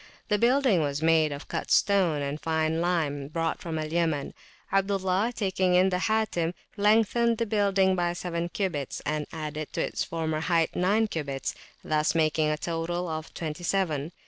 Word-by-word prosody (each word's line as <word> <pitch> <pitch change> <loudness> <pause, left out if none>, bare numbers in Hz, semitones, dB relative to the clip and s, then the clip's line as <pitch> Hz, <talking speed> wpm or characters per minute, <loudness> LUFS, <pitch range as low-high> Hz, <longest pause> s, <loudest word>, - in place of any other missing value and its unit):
The 210 - +2
building 245 - +3
was 145 0 -2
made 160 -2 +4
of 145 +1 -7
cut - - -4
stone 180 -8 +3
and 140 +2 -4
fine 160 0 0
lime 155 -6 0
brought 165 +2 -2
from 165 -2 -4
Al 155 0 -4
Yaman. 160 -4 0 0.4
Abdullah, 195 +2 +1
taking 190 -3 +1
in 185 +1 +5
the 180 -1 0
Hatim, 190 -5 0 0.2
lengthened 225 +2 +3
the 230 - 0
building 200 -3 +2
by 175 -1 0
seven 175 -1 -3
cubits, 170 -9 -3
and 150 0 -1
added 155 -1 -5
to - - -1
its - - -1
former 160 -2 -2
height 165 0 +1
nine 205 +5 +2
cubits, 140 -7 -3
[p.324] - - -18 0.3
thus 155 +1 +2
making 155 -1 +2
a 150 - 0
total 170 +2 -2
of 155 -1 -5
twenty 160 +1 -5
seven. 170 -5 0
170 Hz, 170 wpm, -27 LUFS, 155-190 Hz, 0.4 s, in